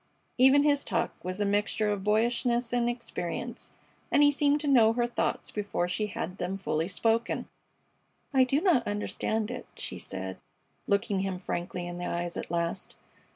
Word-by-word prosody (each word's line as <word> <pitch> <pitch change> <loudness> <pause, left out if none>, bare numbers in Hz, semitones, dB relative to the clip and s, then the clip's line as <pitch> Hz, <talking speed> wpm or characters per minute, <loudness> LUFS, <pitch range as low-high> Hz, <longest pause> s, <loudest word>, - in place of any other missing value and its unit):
Even 265 +3 +7
his 290 -1 +3
talk - - -1
was 185 +2 -4
a 205 - +1
mixture 210 +1 +1
of 200 -2 -2
boyishness 235 +3 +1
and 240 -1 +2
experience 240 0 -4 0.4
and 290 - +5
he 290 - +7
seemed 290 +1 +2
to 300 - -3
know 230 -5 +6
her 240 0 +1
thoughts 240 - -1
before 205 -4 -1
she 200 +4 -1
had 185 -1 -5
them 185 +2 -2
fully 165 -4 -1
spoken. 225 +4 0 0.9
"I 265 -1 +6
do 270 +4 +1
not 335 - +3
understand 210 +1 -1
it," - - -6
she - - -5
said, 95 0 -5 0.5
looking 200 0 +1
him 190 -1 -2
frankly 175 -1 -4
in 175 0 -6
the 175 - -3
eyes 175 0 -2
at - - -5
last. 170 +2 -2
210 Hz, 170 wpm, -29 LUFS, 180-245 Hz, 0.9 s, Even